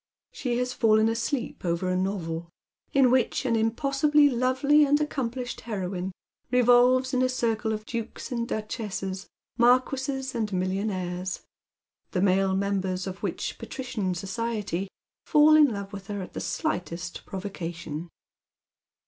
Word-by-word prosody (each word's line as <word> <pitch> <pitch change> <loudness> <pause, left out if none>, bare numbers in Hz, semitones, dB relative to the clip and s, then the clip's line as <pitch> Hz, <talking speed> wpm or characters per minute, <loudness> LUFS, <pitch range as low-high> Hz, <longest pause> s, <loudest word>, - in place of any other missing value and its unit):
She 245 -3 -2
Las 250 0 -1
fallen 220 -1 +4
asleep 235 +3 -2
over 170 +1 0
a 185 - +1
novel, 170 -3 -2 0.4
in 270 -3 +5
which 255 +1 +2
an 235 -3 +2
impossibly 275 +6 +3
lovely 260 +4 +3
and 290 +1 +3
accomplished 255 -4 -3
heroine 190 -4 -3 0.4
revolves 250 +1 +4
in 255 - +2
a 255 - +3
circle 225 -3 0
of 215 0 -3
dukes 230 +2 -5
and 235 -1 -1
duchesses, 200 -3 -4 0.3
marquises 260 +2 +2
and 220 -3 -2
millionaires; 185 -1 -2 0.7
the 180 - +1
male 190 0 +3
members 190 -1 -1
of 190 -1 -6
which - - -3
patiician 215 -8 -3
society 200 -1 -3 0.4
fall 305 0 +6
in 305 -1 +8
love 200 -1 -5
with 195 -1 -8
her 205 -2 -4
at - - -11
the - - -4
slightest 180 - -3
pro 190 - -5
vocation. 170 -4 -6
220 Hz, 135 wpm, -27 LUFS, 190-255 Hz, 0.7 s, in